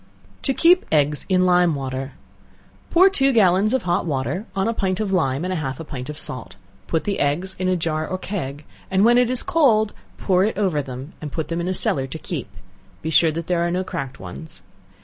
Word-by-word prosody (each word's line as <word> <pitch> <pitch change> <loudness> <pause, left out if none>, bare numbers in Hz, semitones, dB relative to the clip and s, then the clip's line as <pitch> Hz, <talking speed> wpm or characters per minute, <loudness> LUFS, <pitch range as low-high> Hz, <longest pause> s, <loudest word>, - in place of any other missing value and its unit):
To 270 - +1
Keep 355 +2 +5
Eggs 150 -1 +2
in 185 -1 +3
Lime 180 -3 +4
Water. 135 0 -4 0.8
Pour 365 +3 +6
two 275 -8 +3
gallons 200 -2 +4
of 260 - +1
hot 175 +1 0
water 155 - -2
on 195 +1 0
a 230 - +1
pint 190 -4 -1
of 205 -3 -1
lime 140 -3 +1
and 185 - -2
half 135 -6 -3
a - - -5
pint 135 -3 -7
of 150 - -6
salt; - - -2 0.3
put 165 - 0
the 200 - -2
eggs 170 +7 0
in 185 - 0
a 185 - +2
jar 155 -2 -1
or 185 - -3
keg, 150 -7 -5 0.2
and 190 +2 +3
when 240 +1 +6
it 250 -1 +2
is 255 -1 -1
cold, 255 - +3 0.2
pour 185 -1 +2
it 215 -1 -1
over 185 -8 +1
them, 135 +2 -8
and 150 -2 -6
put 160 -1 -4
them 170 0 -2
in 170 - -3
a 185 - 0
cellar 135 -6 +1
to 160 - -6
keep; - - -5 0.5
be 160 - -2
sure 160 0 +5
that 165 +1 -4
there 175 0 0
are 170 - +1
no 180 +2 -1
cracked 135 -7 -5
ones. 95 - -9
175 Hz, 225 wpm, -22 LUFS, 150-200 Hz, 0.8 s, Pour